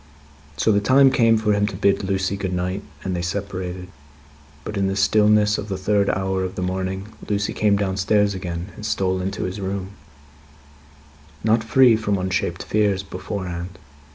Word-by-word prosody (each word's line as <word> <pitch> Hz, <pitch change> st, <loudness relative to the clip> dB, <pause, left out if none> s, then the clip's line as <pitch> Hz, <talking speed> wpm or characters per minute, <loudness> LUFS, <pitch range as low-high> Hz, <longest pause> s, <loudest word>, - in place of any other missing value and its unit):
So, 110 Hz, -, +3 dB
the 100 Hz, -1 st, +3 dB
time 135 Hz, +5 st, +5 dB
came 115 Hz, -3 st, +4 dB
for 110 Hz, -1 st, +1 dB
him 105 Hz, 0 st, +1 dB
to 100 Hz, -, -5 dB
bid 100 Hz, +1 st, +2 dB
Lucie 95 Hz, 0 st, -1 dB
good 95 Hz, -2 st, -3 dB
night, 90 Hz, +2 st, -2 dB, 0.2 s
and 95 Hz, -1 st, -2 dB
they 85 Hz, -, -2 dB
separated. 90 Hz, -1 st, -4 dB, 0.8 s
But, 105 Hz, -, -6 dB
in 100 Hz, -1 st, +1 dB
the 95 Hz, -, -1 dB
stillness 105 Hz, +1 st, +3 dB
of 105 Hz, -, -6 dB
the 95 Hz, -, -2 dB
third 100 Hz, +1 st, +1 dB
hour 95 Hz, 0 st, -1 dB
of 95 Hz, +1 st, -4 dB
the 90 Hz, -, -3 dB
morning, 95 Hz, +2 st, -3 dB, 0.2 s
Lucie 100 Hz, -1 st, 0 dB
came 105 Hz, -2 st, +2 dB
downstairs 100 Hz, +1 st, +1 dB
again, 90 Hz, 0 st, -5 dB
and -, -, -10 dB
stole 95 Hz, -4 st, 0 dB
into 95 Hz, +2 st, -3 dB
his 95 Hz, +2 st, -4 dB
room; 95 Hz, 0 st, -4 dB, 1.5 s
not 110 Hz, +1 st, +3 dB
free 120 Hz, +1 st, +5 dB
from 105 Hz, -2 st, 0 dB
unshaped 95 Hz, -1 st, -2 dB
fears, 100 Hz, -2 st, +1 dB
beforehand. 90 Hz, -2 st, -6 dB
100 Hz, 170 wpm, -22 LUFS, 95-105 Hz, 1.5 s, time